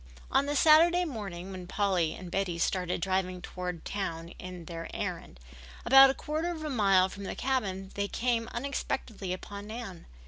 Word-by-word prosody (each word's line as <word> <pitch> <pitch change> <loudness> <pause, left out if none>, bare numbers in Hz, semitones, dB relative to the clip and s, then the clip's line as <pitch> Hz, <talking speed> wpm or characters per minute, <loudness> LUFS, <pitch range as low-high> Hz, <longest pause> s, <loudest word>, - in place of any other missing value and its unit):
On 280 - +3
the 290 - -1
Saturday 335 +4 +6
morning 195 - -6
when 185 -2 -7
Polly 180 -5 +1
and 180 -2 -9
Betty 190 -3 -1
started 180 0 0
driving 185 0 0
toward 180 -1 -6
town 170 -4 -4
on 180 -2 -8
their 165 0 -6
errand, - - -5 0.5
about 270 +2 +9
a 265 - 0
quarter 310 +3 -2
of 325 -3 -5
a 305 - -3
mile 195 -6 +4
from 200 +1 -9
the - - -4
cabin 195 -8 -2
they 200 0 -1
came 235 +1 0
unexpectedly 235 -6 -3
upon 200 +2 -6
Nan. 215 -6 -7
195 Hz, 170 wpm, -30 LUFS, 180-250 Hz, 0.5 s, about